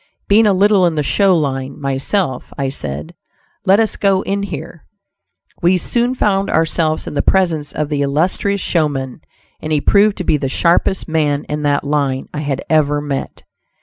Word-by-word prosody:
Being 215 +2 +5
a 200 - +4
little 195 -1 +4
in 165 - -1
the 150 - 0
"show 190 +4 +3
line" 135 -3 -3
myself, 140 +2 -2
I 135 -1 -1
said 75 - -5 0.5
"let 195 +3 +5
us 220 -1 0
go 195 -1 +2
in 200 0 -2
here." 165 -4 -7 0.7
We 180 +1 +3
soon 240 +7 0
found 195 -4 +1
ourselves 160 -1 0
in - - -6
the 145 - +1
presence 165 -6 +1
of 150 -1 -3
the 145 -2 -1
illustrious 175 +7 0
showman, 145 -6 -1 0.4
and 155 - -6
he 150 - +2
proved 205 +6 +3
to 185 - -3
be 155 - +2
the 135 -2 -3
sharpest 175 +5 +1
man 150 -3 0
in 150 0 -4
that 140 - 0
line 140 -2 -1
I 150 - -4
had 140 -3 -3
ever 145 -2 +2
met. 145 -2 -5
155 Hz, 180 wpm, -17 LUFS, 140-190 Hz, 0.7 s, Being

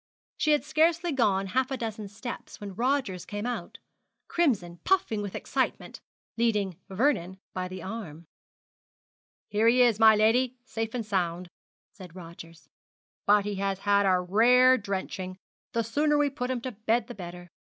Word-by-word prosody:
She 305 - +3
had 295 - +2
scarcely 325 +3 +2
gone 205 -8 +2
half 255 +6 0
a 265 - -2
dozen 220 -3 -5
steps 220 +5 -8
when 205 -2 -7
Rogers 240 -5 -1
came 205 +1 -5
out, 245 0 -4 0.5
crimson, 210 - 0
puffing 370 - +1
with 200 -2 -5
excitement, - - -2 0.4
leading 210 -6 +1
Vernon 190 -4 0 0.2
by 185 0 -3
the 185 -1 -8
arm. 175 -6 -7 1.2
'Here 215 +2 +2
he 250 +2 +6
is, 230 -3 +3
my 220 -1 +8
lady, 240 +4 +2
safe 225 -3 -4
and 235 -3 -2
sound!' 180 -3 -2 0.4
said 185 -6 -13
Rogers; 165 -3 -12 0.6
'but 205 0 +5
he 205 -1 -3
has 195 0 -1
had 200 -1 +3
a 185 -1 +4
rare 245 +8 +5
drenching 190 -3 -4 0.4
the 230 - +1
sooner 295 +7 +1
we 290 -1 +2
put 250 -2 -4
him 255 -2 -2
to 255 - -4
bed 220 +2 0
the - - -8
better.' 175 -2 -9
215 Hz, 160 wpm, -28 LUFS, 190-250 Hz, 1.2 s, my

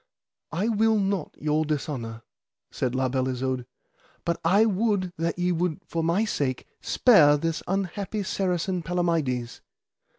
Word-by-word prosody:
I 185 +7 0
will 220 0 +3
not 195 -1 -1
your 155 +1 +1
dishonour, 130 -7 -3 0.5
said 125 0 -2
La 130 0 +1
Beale 130 0 0
Isoud, 130 -1 -2 0.6
but 170 0 -1
I 195 +6 +5
would 200 -3 0
that 165 +1 -1
ye 180 0 +1
would 170 -2 -1
for 165 -1 -2
my 175 +7 +2
sake 135 - -2 0.2
spare 150 - +5
this 165 +2 -2
unhappy 195 +2 -2
Saracen 185 -1 -1
Palamides. 160 -9 -1
170 Hz, 135 wpm, -26 LUFS, 140-195 Hz, 0.6 s, I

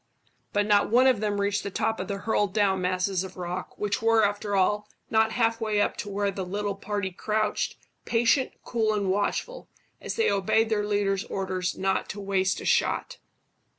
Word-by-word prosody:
But 205 0 +1
not 205 -1 +3
one 245 +4 +5
of 255 -5 +4
them 205 -1 -1
reached 200 0 0
the - - -4
top 220 +3 -1
of 185 - -4
the 200 -1 -3
hurled 205 -1 0
down 195 -3 +2
masses 185 +1 0
of 190 0 -9
rock, 180 +1 -5
which 205 0 -1
were, 225 -1 +4
after 205 0 -1
all, 210 +2 +1 0.2
not 220 0 +3
half 230 -1 +1
way 215 -2 +1
up - - +1
to 205 - -5
where 200 0 0
the 195 - -4
little 200 +2 -2
party 200 -1 -3
crouched, 215 +3 -1 0.3
patient, 240 +3 +2
cool, 220 -2 0
and 200 -2 0
watchful, 345 - -2 0.3
as - - -4
they 455 - +2
obeyed 210 +3 +2
their 210 -2 0
leader's 200 -2 +1
orders 185 -2 -3
not 190 0 0
to 205 - -5
waste 195 -1 0
a - - -8
shot. - - +1
205 Hz, 190 wpm, -27 LUFS, 195-220 Hz, 0.3 s, one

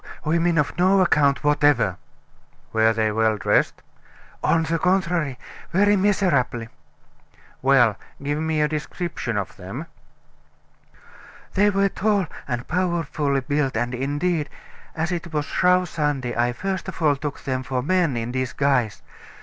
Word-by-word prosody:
women 165 +2 +2
of 150 - +1
no 190 +2 +4
account 150 -6 +3
whatever!" 145 - +3 0.8
"Were 110 0 +4
they 110 -1 0
well 110 0 +1
dressed?" 90 - +1 0.6
"On 165 -1 +3
the 165 +1 -1
contrary, 175 -7 +1 0.3
very 205 +3 +4
miserably." 175 - +1 0.9
"Well, 125 -6 +4 0.3
give 145 +1 -1
me 160 -1 0
a 150 - +3
description 150 - -4
of 100 -2 -4
them." 100 - -7 1.7
"They 205 +2 +4
were 195 0 +2
tall 205 -1 +1 0.2
and 120 -2 -3
powerfully 160 -5 0
built, 135 -2 -1
and 120 +2 -1
indeed, 145 +5 -1 0.5
as 160 +3 -1
it 170 -1 -4
was 150 -2 -1
Shrove 180 +2 +2
Sunday, 145 -7 -2
I 120 +1 +1
first 190 +9 -4
of 190 - -7
all 150 -4 +3
took 145 0 -5
them 130 -1 -2
for 125 0 -3
men 170 -4 +1
in 115 +1 -3
disguise. 130 -3 0
150 Hz, 135 wpm, -23 LUFS, 125-175 Hz, 1.7 s, no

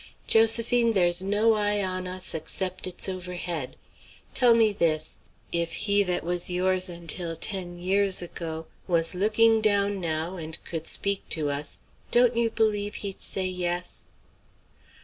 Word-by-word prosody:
"Josephine, 230 +1 +4
there's 175 -3 +3
no 205 +4 +2
eye 205 -1 0
on 185 -1 -3
us 185 0 -5
except 185 +4 -2
it's 180 +1 -1
overhead. 175 -6 -5 0.6
Tell 245 -3 +4
me 225 -2 +4
this; 155 -5 -1 0.3
if 170 -1 -1
he 205 -1 +2
that 180 -3 -1
was 175 +1 +1
yours 185 +1 +1
until 170 0 -3
ten 175 -1 -2
years 190 +2 +3
ago 165 -2 -6 0.2
was 165 -2 +1
looking 220 +4 +3
down 200 -2 +2
now 165 +1 -3
and 160 -1 -2
could 165 -1 -6
speak 200 0 -1
to 150 -3 -1
us, 145 +1 -4 0.3
don't 240 0 +3
you 235 -1 +1
believe 210 -2 0
he'd 195 -2 -4
say 190 - -1
yes?" 180 -1 -3
185 Hz, 145 wpm, -26 LUFS, 175-205 Hz, 0.6 s, Josephine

